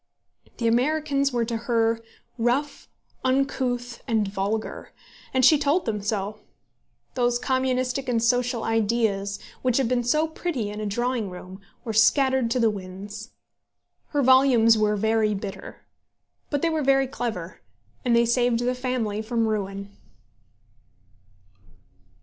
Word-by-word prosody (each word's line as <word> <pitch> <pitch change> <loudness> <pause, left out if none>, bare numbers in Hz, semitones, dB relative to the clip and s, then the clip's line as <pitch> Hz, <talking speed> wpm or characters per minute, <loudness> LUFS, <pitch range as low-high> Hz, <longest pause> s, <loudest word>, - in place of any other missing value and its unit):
The 235 - -3
Americans 280 +3 +1
were 240 -2 0
to 230 0 -3
her 230 -1 0 0.4
rough, 255 +5 -1 0.4
uncouth, 255 -2 -1
and 220 -4 +1
vulgar, 200 +3 -3 0.4
and 260 -1 +3
she 305 +1 +6
told 295 +5 +1
them 210 -2 -2
so. 210 0 -3 0.7
Those 245 -1 +1
communistic 260 +1 -1
and 240 - +1
social 245 0 +1
ideas, 215 -3 0 0.2
which 250 -2 +1
had 265 -3 +2
been 245 0 +1
so 305 +7 +2
pretty 310 -10 -3
in 210 - -6
a 210 - -2
drawing 240 0 -1
room, 185 +2 -10 0.2
were 225 -3 -4
scattered 260 +2 +3
to 250 +2 0
the 225 -2 +3
winds. 200 +3 -8 0.7
Her 290 -2 0
volumes 255 -3 +6
were 210 -1 +2
very 220 0 +1
bitter; 195 -1 -8 0.7
but 285 -2 -2
they 335 - +3
were 315 -1 0
very 270 -1 +3
clever, 220 -9 -5 0.4
and 240 -2 +2
they 235 0 +4
saved 240 0 +2
the 250 +1 +1
family 250 -5 -2
from 230 +1 0
ruin. 200 -1 -4
235 Hz, 135 wpm, -25 LUFS, 215-260 Hz, 0.7 s, she